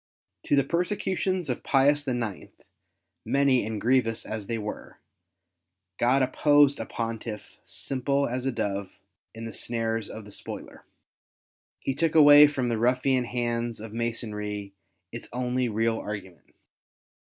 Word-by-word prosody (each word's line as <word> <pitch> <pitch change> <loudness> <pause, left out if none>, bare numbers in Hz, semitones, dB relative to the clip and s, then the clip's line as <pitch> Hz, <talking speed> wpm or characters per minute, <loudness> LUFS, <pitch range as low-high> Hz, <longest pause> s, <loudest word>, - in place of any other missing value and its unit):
To - - +3
the 140 - +4
persecutions 185 +2 -1
of 125 - -2
Pius 145 +1 +3
IX., 120 -6 -3 0.7
many 135 -2 +3
and 110 -1 -4
grievous 115 -1 +1
as 110 -2 -5
they 115 - -2
were, 105 -1 -7 1.0
God 130 +3 +3
opposed 145 +1 +4
a - - -4
Pontiff 115 -2 -5
simple 140 +1 -1
as 125 +2 -3
a - - +1
dove 100 -4 -3 0.4
in 115 0 -7
the 115 - -6
snares 115 -2 -2
of 110 -1 -8
the 105 - -12
spoiler. - - -8 1.0
He 135 - -1
took 160 +3 0
away 145 -1 +9
from 130 -4 -2
the 115 -2 -1
ruffian 125 +1 +2
hands 120 -1 -2
of 110 0 -9
Masonry 105 -3 -4 0.4
its - - -8
only 125 0 -1
real 115 +1 0
argument. 95 -7 -8
120 Hz, 135 wpm, -27 LUFS, 110-135 Hz, 1.0 s, away